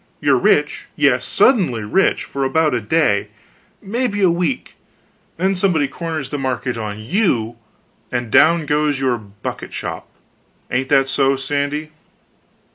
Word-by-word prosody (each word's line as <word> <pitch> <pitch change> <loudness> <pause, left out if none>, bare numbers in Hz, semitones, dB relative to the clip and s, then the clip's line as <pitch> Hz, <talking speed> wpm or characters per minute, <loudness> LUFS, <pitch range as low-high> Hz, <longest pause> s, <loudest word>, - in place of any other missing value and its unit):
You're - - +3
rich - - +1
yes, - - +2
suddenly 170 - +2
rich 150 - +1
for 140 - -4
about 155 +2 +2
a 120 - 0
day, 105 -3 +1 0.6
maybe 205 -1 -1
a 180 - +5
week; 180 +9 -2 0.6
then 190 +1 +1
somebody 180 -6 +1
corners 160 -1 -5
the 145 - -3
market 130 -1 -2
on 105 -2 -5
you, 120 - 0 0.6
and 120 -2 -3
down 160 +4 +5
goes 150 -1 +1
your 130 -3 0
bucket 100 -1 -8
shop; - - -5 0.6
ain't 130 +2 -1
that 135 -2 +4
so, 135 0 +2
Sandy?" 145 +3 -2
140 Hz, 135 wpm, -19 LUFS, 125-170 Hz, 0.6 s, a